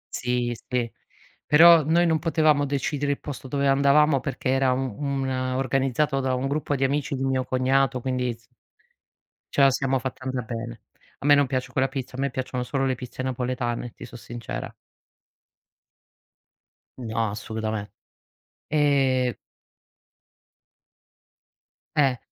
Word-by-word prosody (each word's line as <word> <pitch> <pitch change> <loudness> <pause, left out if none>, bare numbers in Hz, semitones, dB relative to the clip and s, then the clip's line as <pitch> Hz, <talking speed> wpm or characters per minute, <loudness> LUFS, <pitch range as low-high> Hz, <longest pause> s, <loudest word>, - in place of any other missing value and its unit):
Sì, 125 -1 -1 0.2
sì. 120 -2 0 0.6
Però 165 +1 +8
noi 165 +4 +3
non 160 -2 +2
potevamo 155 -3 +2
decidere 145 +1 -1
il - - -8
posto 135 -2 -7
dove 140 +1 0
andavamo 140 +1 +4
perché 135 0 -3
era 135 0 +3
u 125 - +1 0.2
una 130 -2 -1
organizzato 135 +1 0
da 130 -1 0
un 130 +2 -1
gruppo 145 +1 -1
di 135 - -1
amici 140 +1 0
di 135 - -3
un 135 - +1
mio 130 -1 +1
cognato 130 0 +1
quindi 125 -1 -1
s 115 - -28 1.0
ce - - +1
la 135 - +7
siamo 135 0 0
fatta 130 0 -6
andar 130 -2 -2
bene. 115 -1 -6 0.4
A - - -8
me 145 - +8
non 140 -1 +4
piace 130 -1 -3
quella 130 +1 +1
pizza, 130 -1 -6
a - - -6
me 140 0 0
piacciono 125 -1 -3
solo 135 +2 -1
le 130 -1 0
pizze 125 +1 -7
napoletane, 125 -2 -3
ti - - -10
so - - -13
sincera. 120 +1 -7 2.2
No, 115 -3 -2
assolutame 110 0 -4 0.8
ehm 135 -4 +2 2.6
Eh! 135 -4 +3
130 Hz, 145 wpm, -25 LUFS, 125-140 Hz, 2.6 s, Però